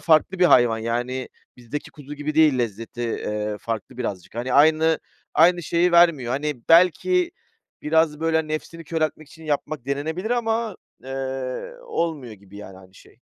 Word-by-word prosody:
farklı 165 +3 +3
bir 180 - +4
hayvan 120 -8 +5
yani 120 +3 -3 0.3
bizdeki 125 +4 -7
kuzu 145 -1 -10
gibi 150 +1 -4
değil 155 -4 +4
lezzeti, 115 0 -4
eee, 105 -2 -3
farklı 115 +2 -5
birazcık. 100 -7 -5
Hani, 125 +2 -3
aynı 160 +3 +4 0.4
aynı 175 +2 +5
şeyi 170 +3 +1
vermiyor. 165 -8 +4
Hani, 145 -2 -3
belki 260 - +4 0.5
biraz, 155 -1 +2
böyle, 160 -1 +1
nefsini 160 +2 -5
köreltmek 155 -1 -2
için 160 -3 -15
yapmak 150 -3 -3
denenebilir 160 +9 -3
ama, 225 -3 -1 0.3
eee, 135 - -4
olmuyor 160 - -3
gibi 100 -1 -15
yani 95 -2 -10
aynı 95 0 -18
şey. - - -19
150 Hz, 150 wpm, -23 LUFS, 120-165 Hz, 0.5 s, hayvan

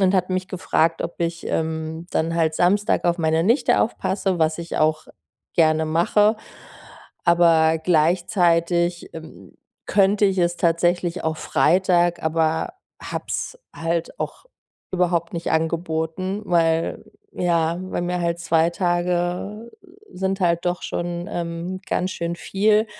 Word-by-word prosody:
und 190 0 +3
hat 185 -1 +1
mich 185 0 -2
gefragt, 165 -3 0
ob 170 - -5
ich, 170 0 -3
ähm, 160 +1 -3
dann 165 +1 0
halt 160 -2 +1
Samstag 200 +5 +2
auf 175 0 +1
meine 160 0 +1
Nichte 235 +8 +3
aufpasse, 195 -4 -1
was 160 -1 +2
ich 170 0 -4
auch 155 0 +1 0.5
gerne 160 -1 +3
mache. 205 +7 +3 0.9
Aber 165 -2 +4
gleichzeitig, 170 +1 +1
ähm, 160 0 -12 0.3
könnte 200 +1 +3
ich 195 -1 0
es 175 -1 +1
tatsächlich 175 +1 +1
auch 160 0 -1
Freitag, 175 +4 +2
aber 160 0 0 0.3
habe - - -5
es - - -4 0.2
halt 165 0 -2
auch - - -5 0.5
überhaupt 175 -2 0
nicht 170 0 -3
angeboten, 165 +4 -1
weil, 165 -2 +1 0.3
ja 170 -1 0
weil 185 -1 -3
mir 180 0 -2
halt 170 0 -1
2 165 0 +2
Tage 175 +5 -1 0.4
sind 190 +1 -2
halt 170 -2 +1
doch 175 0 -1
schon, 175 0 -4
ähm, 170 +2 -4
ganz 185 +1 -1
schön 170 0 -3
viel. 210 +4 +2
170 Hz, 135 wpm, -22 LUFS, 165-185 Hz, 0.9 s, Aber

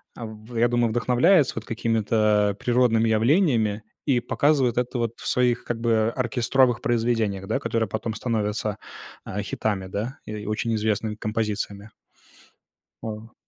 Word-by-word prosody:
а, 115 - -6
в 110 +2 -9
я 120 +1 +4
думаю, 120 -1 +1
вдохновляется 125 - +3
вот 115 - -5
какими-то, 110 -2 +1
а, - - -5
природными 115 -1 +2
явлениями 115 - +2 0.2
и 135 -4 +3
показывает 135 -2 +1
это, 125 +1 -1
вот, 115 0 -3
в - - -6
своих 125 -1 +2
как 120 -1 -3
бы 115 -1 +2
оркестровых 125 0 +2
произведениях, 115 -6 0
да, 110 - 0
которые 115 -2 -1
потом 110 +1 -3
становятся, 105 -2 -2 0.5
а, 105 - -4
хитами, 100 -2 -2
да, 110 +8 -4
и 105 -1 -6
очень 110 +2 -1
известными 110 0 -1
композициями. 105 -1 -3 1.1
А. 110 +1 -7
115 Hz, 145 wpm, -24 LUFS, 105-120 Hz, 1.1 s, я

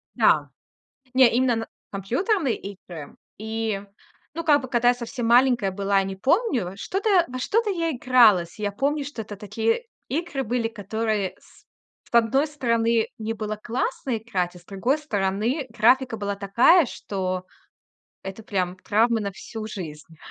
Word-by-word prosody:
Да, - - +3 0.6
не 255 -2 +7
именно 245 -1 +3
на 225 0 -3 0.2
компьютерные 265 - 0
игры, 180 -6 -9 0.2
и, 220 -1 -2 0.5
ну, 335 +2 -4
как 295 -3 +4
бы, 260 - -6
когда 240 0 +3
я - - +5
совсем 245 0 -4
маленькая 240 -4 +4
была, 195 0 +1
я - - +1
не 195 0 -4
помню, 255 - +1
что-то 390 - -2 0.2
во 255 0 -6
что-то 435 - +1
я 335 -4 0
игралась. 225 - +4
Я 205 -1 -1
помню, 285 +7 0
что 280 -5 -6
это 210 -1 -8
такие 225 - -1 0.2
игры 285 -2 -2
были, 235 0 0
которые 215 -2 -2
с - - -22 0.4
с - - -26
одной 265 +6 +3
стороны, 230 -5 +1
мне 220 0 -3
было 215 -1 -4
классно 260 - -2
играть, 185 -6 -2
а - - -11
с - - -22
другой 235 +11 0
стороны, 220 +2 -1
графика 235 +3 +3
была 200 -1 -2
такая, 235 - +5
что 185 -5 -4 0.8
это 195 +3 -8
прям 185 -3 -1
травма 225 +4 +2
на 200 -1 -3
всю 220 +3 -8
жизнь. 165 -6 -8
225 Hz, 155 wpm, -24 LUFS, 200-260 Hz, 0.8 s, не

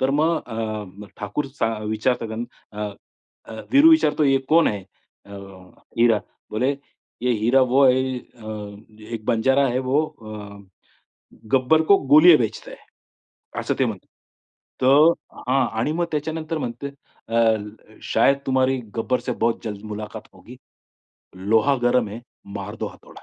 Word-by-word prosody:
तर 130 +1 +2
मग 160 +3 +2
अ, 110 -2 -4 0.3
ठाकूर 105 +8 -3
चा 115 -1 +1
विचारतात 110 +1 -1 0.4
अ, 105 0 -4 0.6
अ, 110 -1 -8
वीरू 295 +4 +7
विचारतो, 150 - +4
"ये 135 -1 +4
कोण 165 +1 +5
है? 100 -3 -4 0.4
अ, 100 - -13 0.7
हिरा" 115 -3 +4 0.3
बोले, 130 +6 0 0.5
"ये 125 - +2
हिरा 130 +3 +4
वो 140 - +6
है, 130 0 +2
अ, 110 -4 -9 0.4
एक 110 -1 -6
बंजारा 130 +4 +3
है 125 +1 0
वो, 150 +4 +3
अ, 105 -7 -10 1.0
गब्बर 135 +5 +4
को 200 - +8 0.2
गोलिया 160 +1 +9
बेचता 115 -5 -4
है" - - -14 0.8
असं - - -1
ते - - +3
म्हणतात. - - -5 0.8
तर 145 +6 +6 0.4
हां 130 0 +3
आणि 145 +7 0
मग 170 +1 0
त्याच्यानंतर 160 +2 -3
म्हणते 120 +1 -5 0.4
अ, 115 - 0 0.7
"शायद 135 +5 +3
तुम्हारी 130 0 +2 0.2
गब्बर 115 +3 0
से 125 - -3
बहुत 115 0 +1
जल्द 105 -2 -5
मुलाकात 105 0 -6
होगी - - -14 0.9
लोहा 115 +6 +4
गरम 120 -2 +2
है, 105 - -7 0.4
मार 105 +2 -6
दो - - -1
हथोडा." - - -16
125 Hz, 140 wpm, -22 LUFS, 110-140 Hz, 1.0 s, गोलिया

